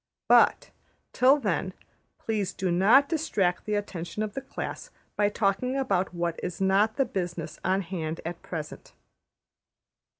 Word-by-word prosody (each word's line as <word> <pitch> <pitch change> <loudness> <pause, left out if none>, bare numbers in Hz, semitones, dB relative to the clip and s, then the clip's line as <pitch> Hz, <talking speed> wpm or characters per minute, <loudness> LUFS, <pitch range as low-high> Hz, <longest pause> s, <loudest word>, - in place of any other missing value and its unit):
But, - - +4 0.4
till 265 +3 +5
then, 285 - -2 0.4
please 205 -4 -2
do 185 -2 -1
not 215 +11 +5
distract 210 - 0
the 210 - 0
attention 200 -1 -4
of 210 -1 -4
the 270 - -4
class 270 - -6 0.3
by 205 -1 +2
talking 210 +6 0
about 195 -9 0
what 170 -1 -2
is 175 - -5
not 195 +3 +3
the 270 - +2
business 175 -6 -4
on 190 +2 +1
hand 165 -3 -4
at 170 +1 -5
present.'' 155 -3 -7
195 Hz, 140 wpm, -27 LUFS, 175-220 Hz, 0.4 s, till